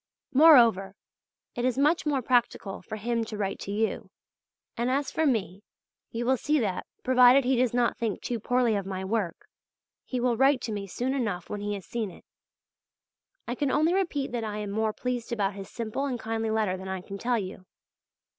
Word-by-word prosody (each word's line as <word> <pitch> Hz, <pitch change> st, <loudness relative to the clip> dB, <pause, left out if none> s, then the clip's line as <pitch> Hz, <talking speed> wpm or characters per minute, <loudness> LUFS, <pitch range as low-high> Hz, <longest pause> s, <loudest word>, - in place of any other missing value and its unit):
Moreover, 235 Hz, -, +6 dB, 0.6 s
it 240 Hz, -, -3 dB
is 255 Hz, 0 st, +1 dB
much 300 Hz, +3 st, +2 dB
more 275 Hz, -4 st, +1 dB
practical 240 Hz, -5 st, 0 dB
for 195 Hz, -, -7 dB
him 230 Hz, +2 st, -1 dB
to 215 Hz, -1 st, -6 dB
write 195 Hz, -1 st, -2 dB
to 200 Hz, -, -6 dB
you; 220 Hz, +2 st, -1 dB, 0.7 s
and 240 Hz, +2 st, -1 dB
as 275 Hz, +2 st, 0 dB
for 320 Hz, -1 st, +1 dB
me, 200 Hz, -6 st, -1 dB, 0.5 s
you 235 Hz, +1 st, -3 dB
will 260 Hz, +1 st, +3 dB
see 300 Hz, +5 st, +1 dB
that, 200 Hz, -6 st, -2 dB, 0.2 s
provided 255 Hz, +1 st, +6 dB
he 260 Hz, +1 st, +3 dB
does 250 Hz, -1 st, +2 dB
not 240 Hz, -1 st, +1 dB
think 225 Hz, -4 st, -1 dB
too 240 Hz, -2 st, -3 dB
poorly 245 Hz, 0 st, +2 dB
of 200 Hz, -1 st, -3 dB
my 190 Hz, -1 st, -4 dB
work, 195 Hz, -4 st, -2 dB, 0.6 s
he 255 Hz, -, -3 dB
will 245 Hz, -1 st, +1 dB
write 270 Hz, +1 st, +4 dB
to 230 Hz, -, -4 dB
me 200 Hz, -2 st, -4 dB
soon 250 Hz, +7 st, -2 dB
enough 210 Hz, -10 st, -2 dB
when 205 Hz, -, -4 dB
he 205 Hz, 0 st, -2 dB
has 195 Hz, -3 st, -8 dB
seen 225 Hz, +1 st, -3 dB
it. 175 Hz, -, -15 dB, 1.2 s
I 240 Hz, -, -2 dB
can 280 Hz, +2 st, -1 dB
only 310 Hz, +5 st, +2 dB
repeat 330 Hz, -9 st, -1 dB
that 240 Hz, -2 st, -2 dB
I 210 Hz, -1 st, -4 dB
am 210 Hz, -1 st, -4 dB
more 220 Hz, +1 st, 0 dB
pleased 245 Hz, +1 st, -4 dB
about 205 Hz, -4 st, 0 dB
his 195 Hz, -1 st, -8 dB
simple 230 Hz, +4 st, -3 dB
and 250 Hz, -3 st, -3 dB
kindly 225 Hz, 0 st, -2 dB
letter 215 Hz, -4 st, 0 dB
than 190 Hz, +1 st, -8 dB
I 190 Hz, -1 st, -4 dB
can 195 Hz, +2 st, -8 dB
tell 240 Hz, +2 st, +1 dB
you. 185 Hz, -2 st, -6 dB
230 Hz, 200 wpm, -27 LUFS, 205-255 Hz, 1.2 s, Moreover